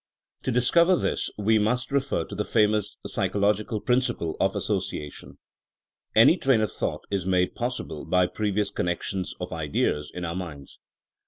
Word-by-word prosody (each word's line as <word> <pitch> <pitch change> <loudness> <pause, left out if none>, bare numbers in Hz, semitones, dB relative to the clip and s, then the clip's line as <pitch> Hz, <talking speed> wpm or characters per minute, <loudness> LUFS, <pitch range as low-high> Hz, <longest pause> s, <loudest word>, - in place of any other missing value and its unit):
To 130 - -1
discover 170 +9 +4
this - - -1
we 110 +1 +3
must 125 +6 0
refer 140 -1 0
to - - -10
the 105 +1 -1
famous 105 -1 +1
psychological 105 +2 0
principle 125 -10 0
of - - +1
association. 75 -1 -4 0.8
Any 115 +11 +7
train 135 -8 +3
of 110 - 0
thought - - -3
is 95 -2 -1
made 90 -1 +2
possible 120 -10 -4
by 90 0 +3
previous 105 +1 -1
connections 90 +2 -2
of - - -5
ideas 75 0 -1
in 90 -1 -5
our 85 0 -3
minds. 80 -7 -7
105 Hz, 150 wpm, -26 LUFS, 90-120 Hz, 0.8 s, Any